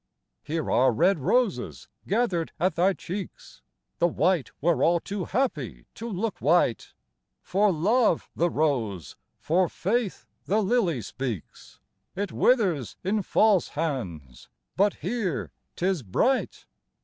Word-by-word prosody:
Here 160 Hz, +1 st, -3 dB
are 130 Hz, +1 st, +4 dB
red 170 Hz, -, +2 dB
roses, 190 Hz, -, 0 dB, 0.2 s
gather'd 195 Hz, -6 st, 0 dB
at 185 Hz, +2 st, +2 dB
thy 185 Hz, +3 st, +3 dB
cheeks, 185 Hz, +1 st, -8 dB, 0.4 s
The 175 Hz, -, +4 dB
white 175 Hz, -2 st, +1 dB
were 170 Hz, +2 st, +2 dB
all 170 Hz, +1 st, +4 dB
too 195 Hz, +1 st, -4 dB
happy 145 Hz, -, -2 dB
to 230 Hz, +1 st, -6 dB
look 210 Hz, +1 st, -3 dB
white: 150 Hz, -6 st, +2 dB, 0.5 s
For 200 Hz, +2 st, +2 dB
love 200 Hz, +4 st, +2 dB
the 175 Hz, +1 st, +2 dB
rose, 120 Hz, -, -1 dB, 0.2 s
for 175 Hz, +3 st, +1 dB
faith 215 Hz, +2 st, -2 dB, 0.2 s
the 210 Hz, +3 st, +2 dB
lily 190 Hz, -, +1 dB
speaks; 120 Hz, -, -6 dB, 0.4 s
It 200 Hz, +2 st, -3 dB
withers 185 Hz, -, +2 dB
in 205 Hz, +3 st, +1 dB
false 200 Hz, -1 st, +3 dB
hands, 90 Hz, -, -5 dB, 0.3 s
but 200 Hz, +2 st, +3 dB
here 190 Hz, -, -3 dB, 0.2 s
'tis 185 Hz, -2 st, 0 dB
bright! 190 Hz, -, 0 dB
175 Hz, 125 wpm, -26 LUFS, 145-205 Hz, 0.5 s, are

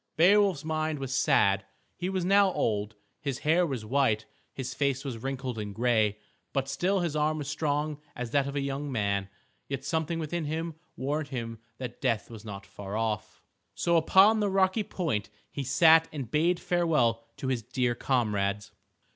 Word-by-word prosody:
Beowulf's 190 Hz, -2 st, +4 dB
mind 155 Hz, -1 st, -1 dB
was 135 Hz, -2 st, -4 dB
sad. 100 Hz, -6 st, +3 dB, 0.3 s
He 180 Hz, -, -3 dB
was 190 Hz, -2 st, -1 dB
now 200 Hz, 0 st, +5 dB
old. 105 Hz, 0 st, -1 dB, 0.2 s
His 140 Hz, -3 st, -3 dB
hair 170 Hz, +3 st, +4 dB
was 125 Hz, -7 st, -4 dB
white, 115 Hz, -3 st, +2 dB, 0.3 s
his 130 Hz, -1 st, -5 dB
face 140 Hz, 0 st, 0 dB
was 125 Hz, -5 st, -4 dB
wrinkled 130 Hz, -2 st, -4 dB
and 105 Hz, -2 st, -5 dB
gray. 110 Hz, -3 st, +2 dB, 0.4 s
But 135 Hz, -1 st, 0 dB
still 185 Hz, +7 st, +1 dB
his 170 Hz, -3 st, -1 dB
arm 155 Hz, +1 st, +1 dB
was 145 Hz, -3 st, -4 dB
strong 150 Hz, -1 st, -1 dB
as 120 Hz, -2 st, -5 dB
that 140 Hz, -1 st, +2 dB
of 140 Hz, -, -5 dB
a 140 Hz, -, 0 dB
young 140 Hz, +1 st, -3 dB
man. 100 Hz, -4 st, 0 dB, 0.4 s
Yet 135 Hz, -1 st, -4 dB
something 160 Hz, +1 st, -1 dB
within 165 Hz, +1 st, -3 dB
him 160 Hz, +2 st, -3 dB, 0.2 s
warned 145 Hz, +3 st, -2 dB
him 115 Hz, -5 st, -5 dB, 0.2 s
that 125 Hz, -2 st, -7 dB
death 120 Hz, -4 st, 0 dB
was 110 Hz, -2 st, -9 dB
not 100 Hz, -3 st, -8 dB
far 100 Hz, +2 st, -6 dB
off. 110 Hz, -2 st, -3 dB, 0.3 s
So 170 Hz, -, +1 dB
upon 190 Hz, +7 st, +6 dB
the 205 Hz, -1 st, +1 dB
rocky 190 Hz, +2 st, +2 dB
point 160 Hz, -, -2 dB, 0.2 s
he 140 Hz, -, -4 dB
sat 160 Hz, +5 st, +6 dB
and 135 Hz, -7 st, -6 dB
bade 170 Hz, +3 st, +2 dB
farewell 150 Hz, -10 st, +1 dB
to 130 Hz, -, -3 dB
his 125 Hz, -3 st, 0 dB
dear 120 Hz, +2 st, 0 dB
comrades. 105 Hz, -4 st, 0 dB
140 Hz, 175 wpm, -29 LUFS, 115-160 Hz, 0.4 s, upon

